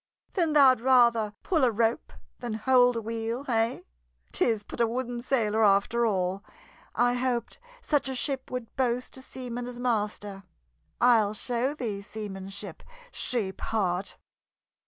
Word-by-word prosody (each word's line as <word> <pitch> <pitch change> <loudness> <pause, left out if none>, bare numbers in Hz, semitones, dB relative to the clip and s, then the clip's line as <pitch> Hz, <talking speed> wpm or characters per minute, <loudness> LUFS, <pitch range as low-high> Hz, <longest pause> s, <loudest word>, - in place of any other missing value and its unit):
"Then 335 -5 +1
thou'd 260 -5 +6
rather 235 -4 +4
pull 320 -6 +1
a 255 - +5
rope 225 +1 0 0.3
than 240 -3 -4
hold 245 +2 +4
a 230 - -2
wheel, 230 +3 -3
hey? 230 -3 0 0.5
'Tis 220 -3 +1
but 235 - -5
a 230 - +4
wooden 240 0 -3
sailor, 225 -4 +1
after 210 +4 +3
all. 190 -1 -1 0.5
I 245 0 +3
hoped 245 -2 -2 0.2
such 290 -3 +1
a 265 - -3
ship 265 0 -1
would 250 -3 -6
boast 250 -1 -1
a - - -8
seaman 245 -2 -6
as 245 -1 -8
master. 210 -4 -2 0.6
I'll 220 -4 +4
show 250 +5 -1
thee 215 -8 -4
seamanship, 200 -2 -7 0.3
sheep 210 - -2
heart!" 190 -3 -1
235 Hz, 140 wpm, -27 LUFS, 210-250 Hz, 0.6 s, thou'd